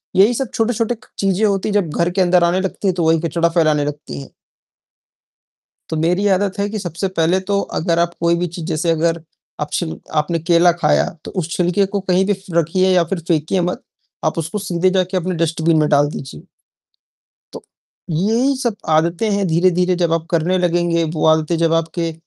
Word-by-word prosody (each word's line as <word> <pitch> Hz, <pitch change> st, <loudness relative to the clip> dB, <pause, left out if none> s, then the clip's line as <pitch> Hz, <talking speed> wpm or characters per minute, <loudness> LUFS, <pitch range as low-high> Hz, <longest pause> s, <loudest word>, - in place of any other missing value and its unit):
यही 205 Hz, +6 st, +5 dB
सब 260 Hz, 0 st, -3 dB
छोटे-छोटे 230 Hz, +1 st, 0 dB
क 220 Hz, -, -22 dB
चीजें 195 Hz, +2 st, +1 dB
होती 200 Hz, 0 st, 0 dB
हैं -, -, -2 dB
जब 195 Hz, -6 st, +1 dB
घर 170 Hz, +1 st, +1 dB
के 190 Hz, +1 st, 0 dB
अंदर 180 Hz, -1 st, +4 dB
आने 175 Hz, +2 st, +2 dB
लगती 195 Hz, +1 st, -3 dB
हैं 185 Hz, -, +2 dB
तो 170 Hz, -, -1 dB
वही 165 Hz, 0 st, +3 dB
कचड़ा 170 Hz, +1 st, 0 dB
फैलाने 155 Hz, -4 st, +2 dB
लगती 145 Hz, -, -6 dB
हैं। -, -, -12 dB, 1.6 s
तो 160 Hz, -, -2 dB
मेरी 180 Hz, +5 st, +1 dB
आदत 200 Hz, 0 st, -2 dB
है 200 Hz, +1 st, 0 dB
कि 215 Hz, -, -4 dB
सबसे 180 Hz, 0 st, -3 dB
पहले 175 Hz, +4 st, +2 dB
तो 200 Hz, 0 st, +2 dB, 0.2 s
अगर 170 Hz, 0 st, 0 dB
आप 170 Hz, 0 st, 0 dB
कोई 170 Hz, 0 st, +2 dB
भी 175 Hz, +1 st, -1 dB
चीज़ 170 Hz, -, -6 dB
जैसे 165 Hz, 0 st, -1 dB
अगर 165 Hz, 0 st, 0 dB, 0.4 s
आप -, -, -3 dB
छिल 80 Hz, -1 st, -2 dB, 0.2 s
आपने 165 Hz, +2 st, -2 dB
केला 170 Hz, +1 st, +4 dB
खाया -, -, +3 dB, 0.2 s
तो -, -, -7 dB
उस 160 Hz, -, -7 dB
छिलके 180 Hz, +2 st, +2 dB
को -, -, 0 dB
कहीं 185 Hz, +2 st, +3 dB
भी 205 Hz, -, +2 dB
फ़ 190 Hz, -2 st, -8 dB
रखिए 185 Hz, +3 st, +2 dB
या 175 Hz, -2 st, +4 dB
फिर 185 Hz, -, 0 dB
फेंकिए 165 Hz, +3 st, +1 dB
मत। 175 Hz, +1 st, -2 dB, 0.4 s
आप 155 Hz, +1 st, 0 dB
उसको 165 Hz, +6 st, -3 dB
सीधे 185 Hz, -1 st, 0 dB
जाके 185 Hz, 0 st, 0 dB
अपने 180 Hz, 0 st, -1 dB
डस्टबिन 165 Hz, 0 st, +1 dB
में 150 Hz, -1 st, +2 dB
डाल 145 Hz, 0 st, +3 dB
दीजिए। 135 Hz, -, -8 dB, 1.1 s
तो, -, -, -9 dB, 0.5 s
यही 225 Hz, -, +1 dB
सब 230 Hz, -4 st, -1 dB
आदतें 170 Hz, +7 st, +1 dB
हैं 200 Hz, -1 st, 0 dB
धीरे-धीरे 180 Hz, +2 st, +2 dB
जब 165 Hz, -1 st, +1 dB
आप 165 Hz, 0 st, -1 dB
करने 175 Hz, +2 st, +1 dB
लगेंगे 175 Hz, -1 st, +1 dB
वो 155 Hz, -, 0 dB
आदतें 160 Hz, +1 st, +3 dB
जब 165 Hz, -1 st, +2 dB
आपके 165 Hz, 0 st, -1 dB
175 Hz, 200 wpm, -18 LUFS, 165-190 Hz, 1.6 s, यही